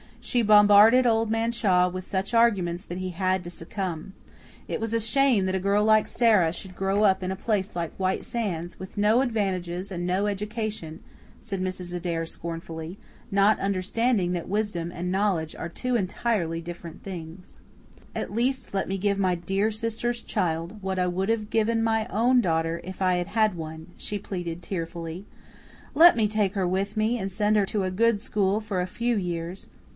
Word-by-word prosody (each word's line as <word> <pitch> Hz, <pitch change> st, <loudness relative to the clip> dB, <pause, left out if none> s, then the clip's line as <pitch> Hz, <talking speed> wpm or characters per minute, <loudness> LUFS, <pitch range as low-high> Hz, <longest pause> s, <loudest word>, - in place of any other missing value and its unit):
She 245 Hz, -2 st, +1 dB
bombarded 210 Hz, +4 st, +7 dB
Old 225 Hz, -1 st, +2 dB
Man 225 Hz, +1 st, +1 dB
Shaw 185 Hz, -6 st, +3 dB
with 185 Hz, 0 st, -6 dB
such 195 Hz, +3 st, -2 dB
arguments 195 Hz, -6 st, +2 dB
that 175 Hz, +1 st, -6 dB
he 185 Hz, 0 st, -3 dB
had 185 Hz, +1 st, 0 dB
to 175 Hz, -, -7 dB
succumb. 175 Hz, 0 st, -5 dB, 0.5 s
It -, -, -3 dB
was 225 Hz, 0 st, -2 dB
a 230 Hz, -, +2 dB
shame 230 Hz, -2 st, +3 dB
that 190 Hz, 0 st, 0 dB
a -, -, +1 dB
girl 200 Hz, +2 st, +2 dB
like 215 Hz, 0 st, +4 dB
Sara 210 Hz, -9 st, +3 dB
should 185 Hz, 0 st, -9 dB
grow 195 Hz, +2 st, +1 dB
up 195 Hz, -2 st, +4 dB
in 185 Hz, 0 st, -2 dB
a -, -, -2 dB
place 200 Hz, -1 st, -1 dB
like 170 Hz, -2 st, -3 dB
White 185 Hz, 0 st, 0 dB
Sands, 180 Hz, -7 st, -3 dB
"with 190 Hz, +2 st, -9 dB
no 215 Hz, +4 st, +4 dB
advantages 190 Hz, -6 st, -2 dB
and 175 Hz, -1 st, -3 dB
no 185 Hz, +3 st, +1 dB
education," 210 Hz, -5 st, -4 dB, 0.4 s
said 200 Hz, -4 st, -5 dB
Mrs. 185 Hz, -1 st, -3 dB
Adair 170 Hz, -2 st, -2 dB
scornfully, 165 Hz, +1 st, -7 dB, 0.3 s
not 200 Hz, +2 st, +4 dB
understanding 195 Hz, +1 st, 0 dB
that 175 Hz, -2 st, -3 dB
wisdom 195 Hz, -4 st, -2 dB
and 175 Hz, +1 st, -4 dB
knowledge 190 Hz, -5 st, 0 dB
are 165 Hz, -, -5 dB
two 250 Hz, +8 st, -2 dB
entirely 185 Hz, -5 st, -1 dB
different 170 Hz, -1 st, -9 dB
things. 180 Hz, -1 st, -9 dB, 0.6 s
"At -, -, -4 dB
least 255 Hz, +2 st, -1 dB
let 195 Hz, -, 0 dB
me 195 Hz, -, -2 dB
give 200 Hz, +1 st, 0 dB
my 185 Hz, -2 st, +2 dB
dear 195 Hz, +5 st, 0 dB
sister's 230 Hz, +2 st, -2 dB
child 175 Hz, +1 st, -2 dB
what 190 Hz, 0 st, -2 dB
I 180 Hz, -, +2 dB
would 190 Hz, +3 st, -1 dB
have 215 Hz, -2 st, 0 dB
given 225 Hz, +1 st, +1 dB
my 225 Hz, 0 st, +1 dB
own 245 Hz, +2 st, +3 dB
daughter 165 Hz, -3 st, 0 dB
if 185 Hz, +2 st, -8 dB
I 185 Hz, -1 st, +3 dB
had 175 Hz, -1 st, -1 dB
had 215 Hz, -3 st, +2 dB
one," 160 Hz, 0 st, -7 dB
she 210 Hz, -, -3 dB
pleaded 175 Hz, -3 st, -5 dB
tearfully. 170 Hz, 0 st, -5 dB, 0.7 s
"Let 340 Hz, +4 st, +8 dB
me 220 Hz, -2 st, +2 dB
take 205 Hz, -2 st, 0 dB
her 190 Hz, -3 st, 0 dB
with 195 Hz, +3 st, -1 dB
me 220 Hz, +3 st, +1 dB
and 195 Hz, -, -2 dB
send 210 Hz, +2 st, +1 dB
her 205 Hz, -2 st, +3 dB
to 210 Hz, -2 st, -1 dB
a 185 Hz, -, -1 dB
good 225 Hz, +2 st, +2 dB
school 205 Hz, -2 st, 0 dB
for 205 Hz, -4 st, -2 dB
a 180 Hz, -, -2 dB
few 235 Hz, +5 st, -1 dB
years. 175 Hz, -1 st, -4 dB
195 Hz, 190 wpm, -26 LUFS, 175-215 Hz, 0.7 s, Let